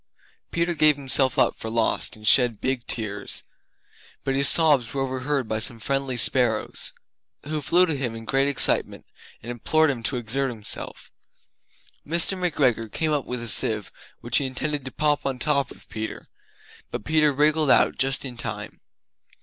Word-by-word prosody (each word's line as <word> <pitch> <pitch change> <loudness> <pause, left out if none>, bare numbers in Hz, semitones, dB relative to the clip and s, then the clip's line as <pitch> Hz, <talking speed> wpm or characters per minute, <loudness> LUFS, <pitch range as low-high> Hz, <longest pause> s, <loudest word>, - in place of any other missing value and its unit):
Peter 170 +1 -1
gave 155 -2 +4
himself 135 -1 +2
up - - +2
for 110 - -7
lost 115 0 -1
and 105 0 -8
shed 120 -2 +5
big 130 -2 -3
tears; 105 -3 -2 0.8
But 135 - -2
his 140 +1 +4
sobs 145 -8 +3
were 135 - -1
overheard 130 0 -2
by 110 0 -2
some 120 +1 +1
friendly 135 +2 -2
sparrows 120 -2 +1 0.5
Who 150 +1 -4
flew 175 +5 +3
to 165 - -2
him 125 -4 -3
in 115 0 -9
great 135 +3 +1
excitement 140 -3 +4 0.4
and 120 - -6
implored 155 +6 +1
him 125 -4 -6
to 125 +3 -2
exert 130 +4 -1
himself. 110 -4 -3 0.9
Mr. 170 +5 +2
McGregor 135 - 0
came 160 -1 -1
up 145 -3 -1
with 125 -1 -5
a - - -5
sieve 105 -1 +1 0.3
which 120 - +1
he 140 - -1
intended 140 +2 -4
to 130 - -5
pop 150 -1 0
on 135 -1 -2
the - - -3
top 140 -3 +1
of - - -15
Peter, 110 0 -7 0.6
but 105 - -7
Peter 155 +1 +2
wriggled 150 +1 +1
out - - +3
just 135 +1 -1
in 125 -3 -8
time. - - -7
135 Hz, 175 wpm, -23 LUFS, 115-150 Hz, 0.9 s, shed